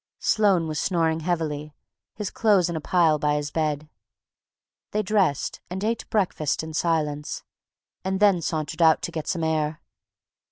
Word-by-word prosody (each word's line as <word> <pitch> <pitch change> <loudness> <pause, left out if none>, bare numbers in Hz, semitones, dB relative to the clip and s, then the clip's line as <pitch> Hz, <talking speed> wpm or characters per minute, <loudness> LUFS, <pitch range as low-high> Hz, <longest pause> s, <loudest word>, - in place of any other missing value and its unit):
Sloane 195 -6 +2
was 155 -1 -2
snoring 165 -3 +1
heavily, 155 -3 -2 0.4
his 210 -3 -4
clothes 200 -6 +3
in - - -4
a 160 - -3
pile 160 -2 +3
by 150 0 +1
his 145 0 -2
bed. 155 -1 -1 1.1
They 215 +1 +1
dressed 190 -8 +1
and 190 +2 -4
ate 230 +1 -2
breakfast 175 -8 0
in 160 0 -7
silence, 150 -3 -1 0.6
and 190 0 -1
then 200 -4 +4
sauntered 155 0 -3
out 160 -1 +5
to - - -3
get 155 -2 -5
some 170 -2 -1
air. 155 -1 0
160 Hz, 155 wpm, -25 LUFS, 150-190 Hz, 1.1 s, out